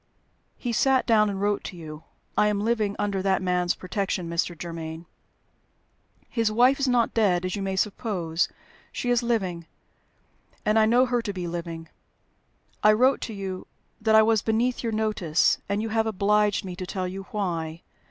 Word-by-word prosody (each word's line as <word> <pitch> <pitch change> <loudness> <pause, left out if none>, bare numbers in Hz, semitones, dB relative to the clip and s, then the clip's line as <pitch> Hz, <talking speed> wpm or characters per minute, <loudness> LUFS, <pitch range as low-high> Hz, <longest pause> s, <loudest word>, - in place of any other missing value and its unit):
He 240 -2 -3
sat 265 +3 +3
down 215 -3 +4
and 195 -1 -3
wrote 205 0 0
to 180 - -7
you. 155 -2 -9 0.3
I 210 - +4
am 210 -1 0
living 215 -2 0
under 200 -2 -1
that 190 0 +2
man's 180 -1 0
protection, 185 -1 -3
Mr. 170 0 -2
Germaine. 165 -1 -6 1.2
His 225 -3 0
wife 250 +5 +4
is 275 - +1
not 245 -2 +2
dead, 185 -5 +2
as 185 - -2
you 200 - -4
may 195 -1 -2
suppose; 185 -5 -1 0.4
she 245 - -2
is 245 0 +3
living, 190 -8 -1 1.0
and 215 +1 +4
I 215 - +5
know 245 +3 +5
her 245 -1 0
to 220 -3 -3
be 180 -2 -4
living. 170 -1 -5 0.9
I 215 - +6
wrote 255 +5 +3
to 225 - -5
you 190 -2 -5 0.3
that 220 0 +3
I 220 - +8
was 220 -1 +3
beneath 230 +4 0
your 230 - -2
notice, 215 -7 +1
and 200 +2 0
you 225 - -3
have 225 0 +1
obliged 210 0 +2
me 180 -1 -6
to 185 -1 -5
tell 185 -1 -3
you 190 +1 -6
why. 170 -7 -3
205 Hz, 180 wpm, -26 LUFS, 180-225 Hz, 1.2 s, I